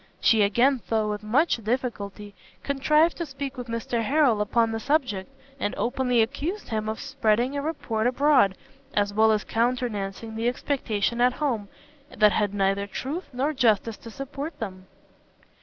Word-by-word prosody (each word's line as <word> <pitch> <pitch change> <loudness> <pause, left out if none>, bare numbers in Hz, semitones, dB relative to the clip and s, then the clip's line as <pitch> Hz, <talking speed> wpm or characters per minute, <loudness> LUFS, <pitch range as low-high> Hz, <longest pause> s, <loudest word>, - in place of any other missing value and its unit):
She 220 -2 +4
again, 240 +6 +3
though 220 -2 +1
with 210 0 -4
much 250 +11 +2
difficulty, 215 -3 -3 0.3
contrived 300 +4 +2
to 340 - -2
speak 275 0 -5
with 250 -2 -7
Mr 230 0 -2
Harrel 255 -3 +3
upon 225 +2 +2
the 225 - -2
subject, 250 -8 0 0.3
and 205 - -2
openly 245 -1 +2
accused 300 - -4
him 215 -1 -2
of 220 - -4
spreading 255 -1 0
a 285 - -1
report 245 -7 -1
abroad, 255 -6 +3 0.4
as 205 0 +1
well 220 +1 +4
as 215 -1 +1
countenancing 230 -3 -1
an 225 +1 -2
expectation 240 -3 -1
at 250 +1 +4
home, 235 -10 -2 0.5
that 210 -1 +6
had 205 -1 +1
neither 200 0 0
truth 285 - -5
nor 275 +4 -1
justice 225 -4 +2
to 230 - -11
support 280 +5 -6
them. 185 -4 -6
235 Hz, 155 wpm, -25 LUFS, 210-275 Hz, 0.5 s, that